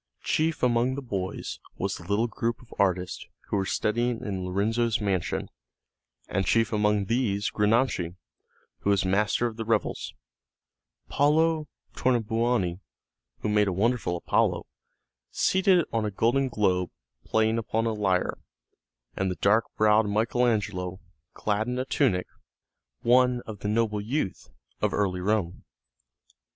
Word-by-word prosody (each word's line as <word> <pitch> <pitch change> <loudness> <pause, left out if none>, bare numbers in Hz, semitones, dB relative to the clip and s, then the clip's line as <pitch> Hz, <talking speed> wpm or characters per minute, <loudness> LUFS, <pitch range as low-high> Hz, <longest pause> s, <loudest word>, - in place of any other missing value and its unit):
Chief 160 -2 0
among 125 +1 +2
the 140 - -4
boys 95 -6 -4 0.2
was 100 +1 -1
the - - -7
little 105 +3 +2
group 115 0 -2
of 120 - -15
artists 90 -2 0 0.3
who - - 0
were 95 -1 0
studying 120 +3 0
in 95 -3 -3
Lorenzo's 110 +5 0
mansion, 95 -4 -1 0.8
and 95 - 0
chief 115 -1 +2
among 105 -1 +2
these 105 -3 0
Granacci, 105 -5 +1 0.6
who - - -1
was 100 -1 +2
Master 105 +5 +2
of 115 -2 -3
the 115 - -3
Revels, 110 -1 -1 0.9
Paolo 155 +2 +2 0.3
Tornabuoni, 115 -6 +1 0.6
who 105 - -1
made 105 -1 +3
a - - +1
wonderful 105 -2 0
Apollo, - - +1 0.6
seated 190 -2 +3
on 115 -1 +1
a 105 - 0
golden 120 +7 +1
globe 95 -6 +1 0.3
playing 110 +1 +1
upon 115 0 -1
a 115 - 0
lyre, 95 -4 0 0.8
and 95 0 0
the 90 - -2
dark 110 +5 +3
browed 105 0 +4
Michael 115 +4 +2
Angelo, 95 -5 -1 0.4
clad 105 +1 -1
in 125 0 -2
a 130 - -1
tunic, 115 -10 +1 0.8
one 125 0 +4
of 105 -3 -8
the 105 - -4
noble 105 -1 +1
youth 110 -2 -3 0.3
of - - +1
early 95 -3 0
Rome. 100 -3 -1
110 Hz, 140 wpm, -27 LUFS, 100-120 Hz, 0.9 s, browed